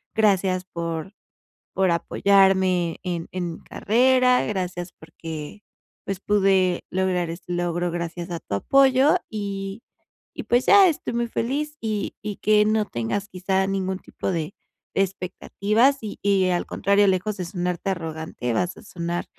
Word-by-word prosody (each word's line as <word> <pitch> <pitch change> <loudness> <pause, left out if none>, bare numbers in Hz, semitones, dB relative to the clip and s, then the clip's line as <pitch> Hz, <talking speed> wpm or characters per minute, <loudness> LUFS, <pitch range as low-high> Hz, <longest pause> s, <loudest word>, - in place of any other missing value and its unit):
gracias 190 -4 +2
por 170 +1 -5 0.6
por 190 -1 +2
apoyarme 190 -1 +3
en 175 -3 -4
en 175 -2 -3
mi - - -11
carrera, 250 +3 +3
gracias 180 -3 -3
porque, 160 +3 -8 0.4
pues, 195 -2 -3
pude 195 -3 +2
lograr 180 -2 0
este 170 +1 -6
logro 175 0 -1
gracias 170 0 -4
a 170 - -3
tu 100 - -4
apoyo, 270 - +4
y 200 0 -5 0.5
y - - -5
pues, 245 +1 +2
ya 395 -2 +8
estoy 310 - -3
muy 235 0 0
feliz 290 +7 -2
y 215 -2 -2
y 210 -1 -5
que 210 0 +4
no 215 0 +2
tengas 120 - -3
quizá, 190 +1 0
ningún 190 -1 -2
tipo - - -5
de 165 +1 -3 0.4
de - - +3
expectativas, 200 +7 0
y 215 -2 -6
y 195 -2 +3
al 175 -1 0
contrario, 200 +1 +2
lejos 195 +3 0
de 180 - -3
sonarte 180 +1 -2
arrogante, 160 -8 -4
vas 180 +6 -1
a - - -12
sonar 175 -2 -4
190 Hz, 150 wpm, -24 LUFS, 175-210 Hz, 0.6 s, ya